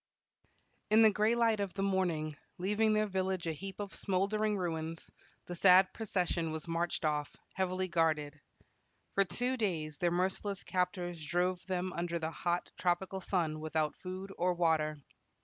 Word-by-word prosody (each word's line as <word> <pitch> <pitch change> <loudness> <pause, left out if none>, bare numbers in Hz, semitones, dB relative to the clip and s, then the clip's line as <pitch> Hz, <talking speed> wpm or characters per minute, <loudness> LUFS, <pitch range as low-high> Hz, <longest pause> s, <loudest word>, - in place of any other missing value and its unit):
In 220 +1 +6
the 220 - +7
gray 215 +3 +2
light 230 -2 +3
of 200 -2 -3
the 195 - -1
morning, 175 -6 0 0.2
leaving 210 +4 +2
their 215 0 +3
village 190 -2 -1
a 165 - 0
heap 195 +5 -7
of 200 -2 -5
smoldering 205 +2 0
ruins, 165 -2 -3 0.3
the 175 - -6
sad 185 +1 +6
procession 180 -6 -1
was 160 +1 -5
marched 170 0 -1
off, 150 -1 -1 0.2
heavily 185 0 -1
guarded. 155 -4 0 0.7
For 195 - +4
two 250 +7 -1
days 160 - -2
their 175 - +2
merciless 190 +3 -1
captors 180 -2 -2
drove 180 +3 0
them 185 -1 -2
under 170 0 -2
the 160 -1 -3
hot 175 +1 -2
tropical 185 +2 0
sun 165 -5 0
without 155 -1 -1
food 190 +1 -7
or 180 +1 +2
water. 160 -3 +2
180 Hz, 155 wpm, -33 LUFS, 165-195 Hz, 0.7 s, the